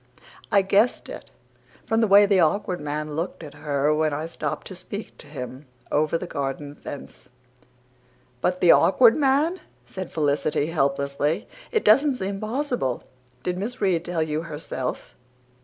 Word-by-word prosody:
I 200 -1 +5
guessed 200 +5 +2
it - - -9 0.6
from 225 +1 +1
the 225 - +3
way 200 +1 +7
the 200 -2 +3
Awkward 180 +2 +1
Man 150 +1 -3
looked 165 +1 -4
at 150 - -9
her 145 0 0
when 155 -1 +1
I 150 +2 -2
stopped 155 -2 -4
to 190 - -8
speak 200 +3 -7
to - - -11
him 130 -1 -8 0.2
over 155 +2 +2
his 180 - -6
garden 140 -1 -4
fence." 145 -1 -10 1.1
"But 180 +6 0
the 175 - +7
Awkward 230 +4 +6
Man!" 300 +5 +2 0.3
said 185 -2 -7
Felicity 145 -1 +1
helplessly. 140 +3 0 0.2
"It 445 -3 0
doesn't 275 +5 +5
seem 195 -1 -3
possible. 240 - -2 0.4
Did 180 0 -2
Miss 225 +6 -4
Reade 180 -5 +1
tell 175 -2 -1
you 155 0 -2
HERSELF?" 150 -5 -5
165 Hz, 155 wpm, -24 LUFS, 150-205 Hz, 1.1 s, way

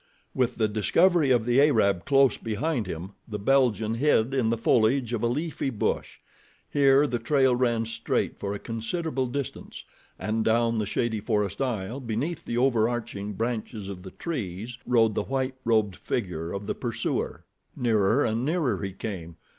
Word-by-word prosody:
With 125 -2 +1
the 110 -2 +2
discovery 155 - +3
of 120 -3 +3
the 120 +3 +4
Arab 110 - +3
close 135 -2 +4
behind 115 - -2
him, 90 +2 -6 0.2
the 105 - -4
Belgian 115 -2 +2
hid 125 -1 +2
in 125 -5 +2
the 115 - +1
foliage 120 +2 +2
of 115 - -1
a 120 - +2
leafy 145 +3 -2
bush. 115 -5 -2 0.5
Here 140 0 +4
the 120 -4 -1
trail 130 +1 +3
ran 120 -2 +1
straight 115 - -1
for 100 0 -4
a - - -3
considerable 130 - -3
distance, 135 +1 -5 0.3
and 110 +1 -1
down 115 0 +2
the 105 - -1
shady 110 0 -1
forest 105 -2 -1
aisle, 120 -1 -2
beneath 130 +7 -3
the 120 - -2
overarching 115 -4 0
branches 110 -2 -3
of 95 -2 -7
the 95 - -9
trees, 115 - -5
rode 115 -3 +4
the - - 0
white 130 0 -1
robed 110 -4 +2
figure 85 -8 -3
of 100 +1 -5
the - - -1
pursuer. 120 -2 -3 0.3
Nearer 115 +2 +2
and 110 +2 0
nearer 145 - 0
he 95 -1 -3
came. 90 -5 -6
115 Hz, 165 wpm, -26 LUFS, 105-130 Hz, 0.5 s, the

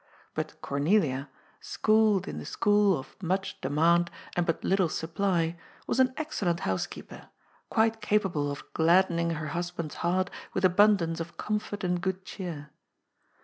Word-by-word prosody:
But - - -4
Cornelia, 140 -2 +1 0.3
schooled 215 -3 +2
in - - -5
the - - -8
school 205 -3 +3
of 135 - -10
much 190 +2 -2
demand 170 +5 +3 0.3
and 175 -1 0
but 165 - -1
little 190 -3 +2
supply, 170 0 -1 0.3
was - - -1
an 260 0 +5
excellent 200 - -1
housekeeper, 95 0 -4 0.4
quite 225 0 +2
capable 195 -9 +1
of 145 - -5
gladdening 170 0 +3
her 155 -1 -4
husband's 170 -1 -4
heart 185 +2 +1 0.2
with 190 - +2
abundance 185 -3 +4
of 165 +1 -6
comfort 210 -1 -3
and 180 -1 0
good 190 0 -2
cheer. 160 -6 -7
175 Hz, 140 wpm, -28 LUFS, 165-200 Hz, 0.4 s, an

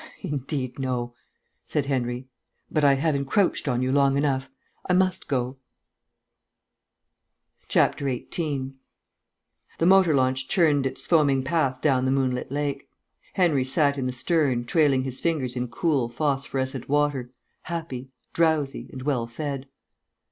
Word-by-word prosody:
"Indeed, 140 -5 -3
no," 125 -2 -2 0.5
said 145 -2 -1
Henry. 125 -2 -2 0.4
"But 155 - +1
I 140 -1 +6
have 150 +3 +1
encroached 140 +6 +1
on 125 -1 +1
you 130 - 0
long 140 0 +3
enough. 135 -2 0 0.4
I - - +4
must 185 0 +1
go." 130 -3 -1 2.1
18 135 0 0 1.0
The 165 - +1
motor 185 -4 +5
launch 130 0 +1
churned 150 -6 +3
its - - -8
foaming 145 -5 +3
path 135 -4 0
down 130 -4 +2
the 130 - +2
moonlit 130 -2 0
lake. 145 -1 -3 0.4
Henry 165 -8 +2
sat 140 +2 +3
in 130 -2 -2
the - - -1
stern, 130 -2 +1
trailing 140 -2 +3
his 130 -1 -3
fingers 145 -7 -1
in 125 0 -2
cool, 130 0 0
phosphorescent 135 -1 -2
water, 145 -3 +1 0.4
happy, 155 -6 -5 0.2
drowsy, 160 -4 +1
and 130 -1 -8
well 130 -5 0
fed. 140 +2 -5
135 Hz, 130 wpm, -25 LUFS, 130-150 Hz, 2.1 s, I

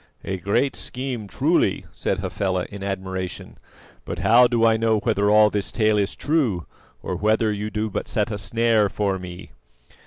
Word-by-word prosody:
"A 95 - -2
great 100 +9 0
scheme 125 -4 -5
truly," - - +1
said - - -2
Hafela 95 -2 -1
in 100 -1 -8
admiration; 95 -2 -5 0.5
"but - - -5
how 120 +2 +5
do 115 -2 +2
I 115 -1 +5
know 110 0 +2
whether 105 -2 +1
all 105 0 +6
this 100 -2 -2
tale 110 -2 +2
is 100 0 -1
true, 130 - 0 0.4
or 90 - -3
whether 110 +3 +2
you 105 +1 -4
do 105 +1 -2
but 105 - -4
set 110 +1 -1
a 105 - -3
snare 110 0 +2
for 100 -1 -1
me?" 90 -1 -9
105 Hz, 175 wpm, -23 LUFS, 100-115 Hz, 0.5 s, all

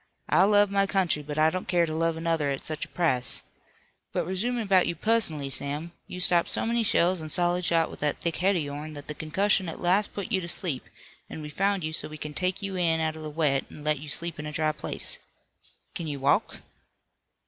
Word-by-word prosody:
I 190 - +5
love 205 0 +4
my 195 0 +2
country, 185 -6 +1
but 145 0 -6
I 155 +1 +4
don't 185 +1 -4
care 175 -2 +3
to 155 - -4
love 165 0 0
another 165 -3 0
at 135 -1 -3
such 155 -1 -3
a - - -20
price. 130 -8 +1 0.7
But - - -1
resumin' 225 +5 -1
'bout 190 -2 +4
you 170 - -1
pussonally, 160 -8 +1
Sam, 145 +5 -3 0.2
you 180 - -7
stopped 175 -1 +3
so - - +3
many 235 +1 +1
shells 180 -4 +2
an' 155 - -6
solid 175 +2 +1
shot 165 -2 +2
with - - -10
that 150 0 -1
thick 170 -1 -1
head 195 +3 +2
of 165 - 0
yourn 145 +2 -6
that 145 -1 -9
the 150 - -4
concussion 185 +5 0
at 160 - -7
last 190 +4 +1
put 200 -3 -5
you 190 - +2
to 170 - -6
sleep, 170 -6 -1 0.4
an' 155 - -7
we've 150 0 -8
found 195 0 +1
you 155 0 -3
so - - +3
we 155 - -8
kin 150 0 -6
take 185 +4 -1
you 195 -1 -3
in 165 -3 +2
out 160 -1 -1
of 160 - -8
the 155 - -5
wet 150 -3 +1
an' 150 - -11
let 150 -2 +1
you 150 - -9
sleep 170 +2 +2
in 150 - -5
a - - -5
dry 155 0 +1
place. - - -2 0.7
Kin 165 - -4
you 145 -2 -4
walk?" 135 - +1
165 Hz, 235 wpm, -27 LUFS, 150-185 Hz, 0.7 s, I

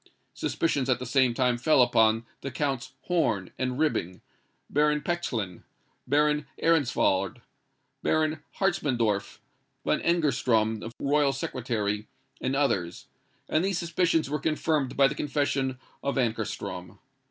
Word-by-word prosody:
Suspicions 140 -5 0
at 125 - +3
the 125 - -6
same 125 -1 +3
time 125 -2 +2
fell 155 +3 +4
on 115 -1 +3 0.2
the 140 - -4
Counts 135 -1 -2
Horn 115 - 0
and 130 -1 -1
Ribbing, 115 - 0 0.5
Baron 150 +1 +2
Pechlin, 115 - -2 0.5
Baron 150 +1 +2
Ehrensvard, 125 - +2 0.6
Baron 155 -1 +1 0.2
Hartsmandorf, 120 - 0 0.5
Von - - +2
Engerstrom 130 -9 +2
the 115 - -6
Royal 145 0 +2
Secretary, 110 -6 -2 0.3
and 130 +1 0
others; 95 -12 -1 0.4
and 155 - +1
these 195 -2 0
suspicions 170 -2 +1
were 150 +2 -2
confirmed 155 -3 0
by 135 -1 +6
the - - -3
confession 140 -3 -1 0.2
of 140 - -1
Ankarstrom. 120 -4 -2
135 Hz, 120 wpm, -27 LUFS, 115-150 Hz, 0.6 s, by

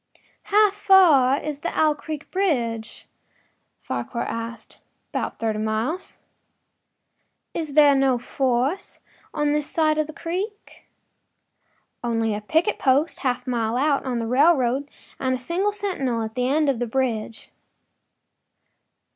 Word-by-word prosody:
” - - -38
“How 420 0 +5
far 335 -10 +5
is 300 -2 -5
it - - -29
to - - -26
the - - -4
Owl 310 -1 +4
Creek 300 0 -8
bridge?” 235 - -2 0.7
Farquhar 235 -1 -4
asked. 230 +1 -6 0.3
“About - - -3
thirty 220 -1 -2
miles.” 220 - -2 1.4
“Is 310 -4 -4
there 295 -2 +7
no 270 -2 +3
force 260 +7 -1 0.3
on 295 0 0
this 300 -1 -1
side 310 -1 +2
of 305 - 0
the - - -7
creek?” 380 +7 -6 1.2
“Only 225 -2 0
a 205 - -4
picket 320 - 0
post 280 +4 +2
half 250 -1 -1
a - - -5
mile 230 -1 0
out, 285 +1 +1
on 255 -2 -2
the 230 - -2
railroad, 270 +1 +2 0.3
and 260 -1 0
a - - -3
single 345 +10 -1
sentinel 280 - -2
at 220 0 -5
this 250 +1 0
end 305 +1 +2
of 270 -4 +1
the 245 - -1
bridge. 230 -3 -3
270 Hz, 145 wpm, -23 LUFS, 240-315 Hz, 1.4 s, there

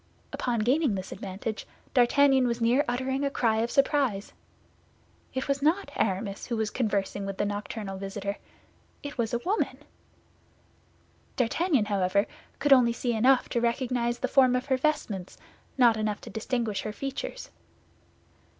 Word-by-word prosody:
Upon 240 -3 -1
gaining 255 +1 +2
this 190 -1 -6
advantage 200 +2 -5 0.3
D'Artagnan 265 +1 +4
was 235 0 -1
near 240 +5 +3
uttering 260 +3 -1
a 280 - +1
cry 230 -5 +1
of 230 +2 0
surprise; 270 -7 +1 1.0
it 265 - -2
was 280 0 0
not 315 +1 +1
Aramis 195 0 -1
who 235 - -2
was 220 -1 -1
conversing 200 -4 -1
with 195 0 -5
the - - 0
nocturnal 205 -1 -4
visitor, 200 +1 -4 0.7
it 285 -3 -7
was 225 -2 0
a 240 - +1
woman! 410 +5 0 1.6
D'Artagnan, 265 - +1
however, 200 0 +1 0.3
could 290 -1 +5
only 245 -3 +5
see 240 +1 -1
enough 250 +4 +4
to 235 - 0
recognize 240 0 0
the - - -1
form 255 -2 +4
of 250 - -1
her 265 -2 +1
vestments, 255 -10 -2 0.4
not 240 -4 +5
enough 215 -1 -1
to - - -10
distinguish 220 -3 -2
her 215 - -5
features. 275 - -5
235 Hz, 150 wpm, -28 LUFS, 210-265 Hz, 1.6 s, could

